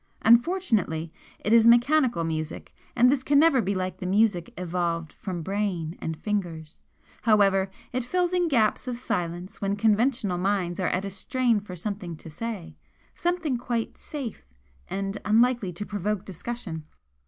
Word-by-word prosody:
Unfortunately, 225 - +3 0.3
it 215 - 0
is 230 0 +7
mechanical 240 - +4
music, 160 -1 -4 0.2
and 250 +1 +6
this 275 -2 +1
can 285 +2 +2
never 285 -4 +5
be 200 -1 -1
like 185 0 -2
the 185 - -4
music 195 -3 +2
evolved 170 -2 -2
from 180 -4 -5
brain 190 -4 -2
and 160 -1 -3
fingers; 170 -7 -4 0.4
however, 195 -3 +4 0.2
it 255 0 0
fills 360 +7 0
in 355 -1 +2
gaps 235 -4 +2
of 245 -1 -2
silence 175 -4 -3
when 200 0 0
conventional 215 -2 +2
minds 185 -2 0
are 185 - +1
at 185 +2 -1
a 195 - -4
strain 230 +4 +1
for 195 -3 -9
something 185 -1 -4
to 160 - -11
say 210 +1 -5 0.4
something 345 -7 -1
quite 235 -2 -2
'safe' 275 -7 -7 0.4
and 195 +1 -3
unlikely 225 -2 +3
to 180 +4 -6
provoke 205 0 -2
discussion!" 190 -3 -5
205 Hz, 155 wpm, -26 LUFS, 180-240 Hz, 0.4 s, is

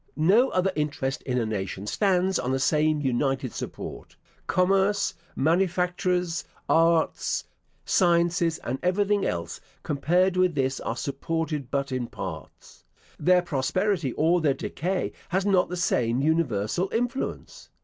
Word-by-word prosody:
No 205 +12 +4
other 185 +1 +1
interest 145 -3 -2
in 125 -1 0
a 120 - +1
nation 100 -2 -4
stands 190 - +1
on 125 - -2
the 135 - +1
same 150 +2 +2
united 135 -1 0
support. - - -7 0.3
Commerce, 195 +2 +2 0.2
manufactures, 180 +1 +1 0.2
arts, 165 0 +2 0.4
sciences, 170 -2 +2
and 130 +3 -3
everything 200 +3 +1
else, 85 -1 -4 0.2
compared 180 +6 +1
with 185 -3 +2
this, 135 -1 0
are 115 - -4
supported 150 0 -3
but 140 -1 -2
in 130 -2 -2
parts. 90 -8 -9 0.4
Their 180 0 +4
prosperity 170 +2 0
or 170 +3 +2
their 145 -4 +2
decay 180 +7 -2 0.2
has 190 +2 0
not 190 -3 +3
the 180 - -4
same 125 -8 +1
universal 150 - 0
influence. 245 +3 -3
165 Hz, 130 wpm, -26 LUFS, 135-185 Hz, 0.4 s, No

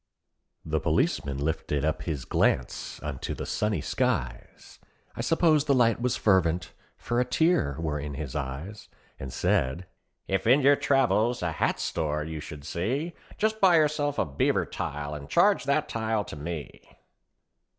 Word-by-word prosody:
The - - 0
p'liceman 70 -1 0
lifted 75 -1 -1
up 80 -1 -1
his 70 -5 -4
glance 65 - 0
unto 75 -3 -4
the - - -5
sunny 105 -6 -1
skies, - - -3 0.4
I - - -3
s'pose 160 -3 +3
the 140 - +3
light 115 -2 +3
was 125 0 0
fervent, 90 -4 +2 0.2
for 120 0 -1
a - - +4
tear 125 - +2
were 75 -2 -2
in 70 0 -5
his 70 -3 -6
eyes, 75 +11 -5 0.3
And 65 -1 -6
said, 65 +10 0 0.4
"If 95 +2 -1
in 130 +5 +6
your 140 +1 +6
travels 125 -6 +2
a 85 - 0
hat - - 0
store 75 -1 -1
you 80 0 -5
should 75 -1 -9
see, 130 - -2 0.2
Just 220 0 0
buy 185 -3 +6
yourself 150 -2 +2
a - - +2
beaver 70 -1 +1
tile 75 +1 -4
and 75 -1 -8
charge 205 - +4
that 145 +2 +1
tile 110 -4 -1
to - - -8
me." 75 0 -6
90 Hz, 160 wpm, -27 LUFS, -, 0.4 s, in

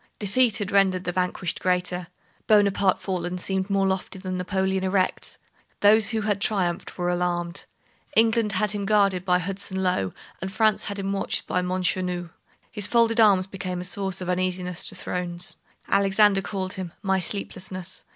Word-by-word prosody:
Defeat 220 +3 +2
had 205 -1 -3
rendered 190 -2 +3
the 180 - -2
vanquished 180 -1 -2
greater. 180 -1 -1 0.4
Bonaparte 200 -3 +4
fallen 180 -1 -3
seemed 190 +1 -2
more 195 -1 +2
lofty 190 0 -2
than 185 -1 -4
Napoleon 190 +1 0
erect. 185 0 0 0.4
Those 210 +1 +5
who 225 -2 -1
had 205 -1 0
triumphed 185 -5 0
were 175 -1 0
alarmed. 175 0 -1 0.5
England 225 -1 +3
had 210 +2 +1
him 205 -2 -3
guarded 200 -4 +3
by 180 -1 +3
Hudson 190 +1 -2
Lowe, 180 - +1 0.3
and 190 +1 -4
France 215 0 +2
had 200 -1 -3
him 195 0 -2
watched 195 - -1
by 180 - 0
Montchenu. 180 -1 -1 0.4
His 205 -2 0
folded 230 -1 +3
arms 200 -4 +6
became 185 -2 -5
a - - -4
source 190 0 -2
of 180 - -4
uneasiness 180 -1 -1
to - - -9
thrones. 175 0 -3 0.3
Alexander 195 0 +4
called 190 -2 -4
him 180 -3 -6
"my 190 -1 +2
sleeplessness." 185 -1 -4
190 Hz, 160 wpm, -25 LUFS, 180-200 Hz, 0.5 s, arms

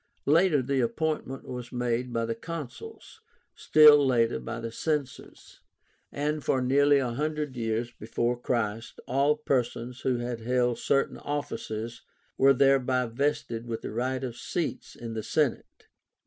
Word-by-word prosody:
Later 155 -2 +4
the 135 +1 0
appointment 150 +1 -2
was 125 -1 -6
made 125 0 -1
by 115 -1 -1
the 115 - -2
Consuls, 165 - -8 0.3
still 150 -1 +7
later 120 -3 +2
by 115 +1 -6
the 115 0 -5
Censors, 145 +1 -4 0.5
and 150 +1 -2
for 130 - +1
nearly 140 +3 +4
one 125 -3 -2
hundred 150 -2 -2
years 115 0 -2
before 120 +2 -2
Christ 115 -2 -2
all 140 +4 +2
persons 125 -3 -2
who 130 -2 +1
had 120 -1 -4
held 125 +1 0
certain 140 0 0
offices 120 -6 -4 0.3
were 135 +1 +5
thereby 130 -1 +3
vested 120 -2 -2
with 115 -1 -4
the - - -5
right 130 +3 -2
of 125 -3 -4
seats 165 +7 -4
in 115 -1 -7
the 110 - -3
Senate. 140 +4 -1
125 Hz, 145 wpm, -28 LUFS, 120-145 Hz, 0.5 s, still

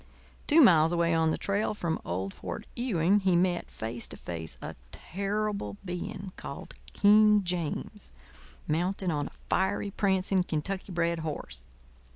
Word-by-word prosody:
Two 320 +2 +7
miles 165 -8 +6
away 170 -1 +2
on 160 -1 +3
the - - 0
trail 205 +2 -1
from 170 -5 -2
old 95 +3 -3
Fort 90 -2 -6
Ewing 205 -5 +2
he 190 -3 +2
met, 175 0 +1
face 115 +1 -5
to - - -8
face, 80 -2 -6
a - - -7 0.2
terrible 200 - -3
being 185 +2 -5
called 140 - -8 0.2
King 210 0 +6
James, 170 - -3 0.6
mounted 180 +3 0
on 145 -2 -1
a - - -14
fiery, 200 +1 0
prancing, 190 -1 +2
Kentucky 180 +4 -3
bred 170 -1 0
horse. 105 - -5
175 Hz, 145 wpm, -29 LUFS, 155-200 Hz, 0.6 s, Two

